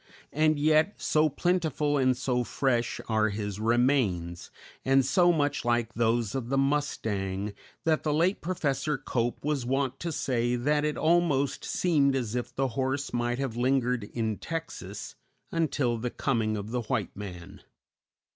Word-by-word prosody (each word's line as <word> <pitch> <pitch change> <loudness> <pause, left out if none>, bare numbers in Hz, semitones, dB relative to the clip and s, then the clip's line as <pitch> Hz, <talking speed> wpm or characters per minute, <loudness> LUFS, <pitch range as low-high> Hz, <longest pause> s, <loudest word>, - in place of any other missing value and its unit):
And 155 +1 +3
yet, 155 +6 +3
so 155 0 +2
plentiful 155 -2 0
and 130 -1 +3
so 125 -2 0
fresh 120 -2 0
are 110 -1 +2
his 105 -1 -4
remains, 110 -8 +1 0.3
and 135 0 +4
so 175 +6 +4
much 145 -3 0
like 120 -1 0
those 115 -2 +1
of 125 -3 -3
the 135 - +1
mustang, 105 -9 -1 0.3
that 160 -1 +2
the 150 - 0
late 170 +6 +2
Professor 150 -4 -1
Cope 120 +2 -2
was 150 -4 0
wont 135 +1 -1
to 170 - -3
say 120 -4 0
that 145 +5 +1
it 150 0 -1
almost 155 -5 +2
seemed 145 -6 +2
as 120 -5 -2
if 120 -1 -3
the 135 0 0
horse 135 +3 -2
might 120 0 0
have 135 -4 -3
lingered 125 -2 +1
in 110 -1 -2
Texas 165 - -6 0.4
until 145 -8 0
the 125 +2 -2
coming 110 -4 0
of 105 +2 -6
the 125 0 -1
white 115 -3 -2
man. 90 -4 -8
130 Hz, 155 wpm, -28 LUFS, 115-150 Hz, 0.4 s, and